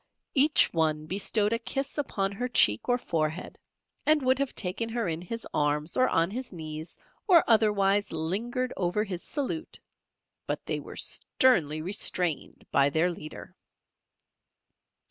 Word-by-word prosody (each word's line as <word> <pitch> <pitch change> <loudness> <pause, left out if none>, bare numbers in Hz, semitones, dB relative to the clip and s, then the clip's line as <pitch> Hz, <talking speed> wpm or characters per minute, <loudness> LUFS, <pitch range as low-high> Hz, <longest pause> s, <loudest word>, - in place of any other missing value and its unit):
Each 295 +1 +5
one 155 -2 0
bestowed 205 +4 0
a 230 - 0
kiss 270 +4 -3
upon 200 -9 -2
her 245 +5 -3
cheek 110 - +3
or 245 - +3
forehead, 160 -5 -3 0.4
and 305 -2 +3
would 260 +1 +2
have 275 -1 -2
taken 205 +4 -1
her 230 -3 -2
in 165 0 -3
his 230 +6 -6
arms, 150 +2 0
or 255 - +3
on 165 +3 +1
his 250 +3 -5
knees, 155 -2 -7 0.3
or 350 -5 +7
otherwise 205 -3 +3
lingered 220 +11 -2
over 180 +3 0
his 185 -4 -5
salute, 310 +3 -5 0.7
but - - -3
they - - -2
were - - -10
sternly 155 - +2
restrained 180 -3 -1
by 140 0 +4
their 160 +5 +1
leader. 155 -2 -10
195 Hz, 145 wpm, -28 LUFS, 160-245 Hz, 0.7 s, or